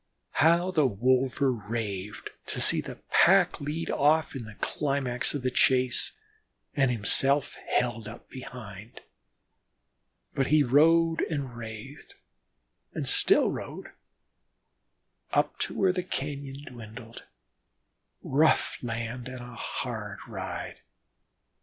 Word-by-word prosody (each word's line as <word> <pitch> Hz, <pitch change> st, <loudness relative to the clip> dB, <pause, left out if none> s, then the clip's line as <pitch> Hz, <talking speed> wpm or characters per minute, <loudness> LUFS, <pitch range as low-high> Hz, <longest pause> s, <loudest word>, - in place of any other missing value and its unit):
How 170 Hz, +4 st, +4 dB
the 155 Hz, -6 st, +3 dB
wolver 130 Hz, +4 st, +2 dB
raved 105 Hz, -3 st, -5 dB, 0.2 s
to -, -, -3 dB
see -, -, +4 dB
the -, -, -8 dB, 0.2 s
pack -, -, +5 dB
lead 150 Hz, +3 st, -3 dB
off 155 Hz, +1 st, +2 dB
in 125 Hz, -4 st, -5 dB
the 110 Hz, -1 st, -11 dB
climax 135 Hz, -1 st, 0 dB
of 140 Hz, -, -4 dB
the 130 Hz, -, 0 dB
chase, 130 Hz, 0 st, +2 dB, 0.6 s
and 135 Hz, -3 st, +3 dB
himself 135 Hz, +6 st, +3 dB
held 115 Hz, -3 st, 0 dB
up 110 Hz, -, -10 dB
behind. 110 Hz, -5 st, -10 dB, 1.3 s
But 135 Hz, -1 st, 0 dB
he 155 Hz, -1 st, +5 dB
rode 165 Hz, +5 st, +4 dB
and 140 Hz, -6 st, -3 dB
wrathed 115 Hz, +4 st, -9 dB, 0.8 s
and -, -, -2 dB
still -, -, +4 dB
rode, -, -, -7 dB, 1.4 s
up -, -, +1 dB
to -, -, -2 dB
where 190 Hz, -2 st, +3 dB
the 180 Hz, -, -1 dB
cañon 140 Hz, -4 st, -5 dB
dwindled 115 Hz, -1 st, -10 dB, 1.0 s
rough 150 Hz, +4 st, +2 dB
land 120 Hz, +1 st, -4 dB
and 130 Hz, -1 st, -7 dB
a 120 Hz, 0 st, -10 dB
hard 110 Hz, -3 st, -5 dB
ride. 95 Hz, -5 st, -6 dB
130 Hz, 115 wpm, -28 LUFS, 115-145 Hz, 1.4 s, pack